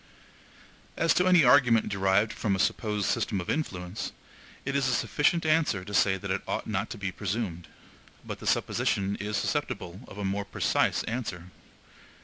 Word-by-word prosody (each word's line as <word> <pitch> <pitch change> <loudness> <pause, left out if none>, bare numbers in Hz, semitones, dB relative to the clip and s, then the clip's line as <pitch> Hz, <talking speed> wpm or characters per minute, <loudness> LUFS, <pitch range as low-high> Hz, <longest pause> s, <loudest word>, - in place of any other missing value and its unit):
As 165 - +3
to 180 - +2
any 180 -3 +6
argument 120 -4 +5
derived 100 +2 +2
from 100 -3 0
a - - -2
supposed 105 0 0
system 100 - 0
of 90 - -3
influence, 95 - -3 0.5
it 140 +1 -2
is 140 -2 +2
a 130 - +2
sufficient 160 +6 +1
answer 155 - +2
to 105 - -8
say 95 -1 +3
that 100 +1 -5
it 95 - 0
ought - - -2
not 105 0 -2
to - - -6
be 95 -2 -3
presumed; 95 -3 -3 0.6
but - - -6
the - - -7
supposition 100 0 +1
is 105 0 -3
susceptible 90 0 -2
of 100 - -11
a 100 - -3
more 100 +1 -1
precise 100 - +1
answer. 95 -7 -5
105 Hz, 170 wpm, -28 LUFS, 95-125 Hz, 0.6 s, any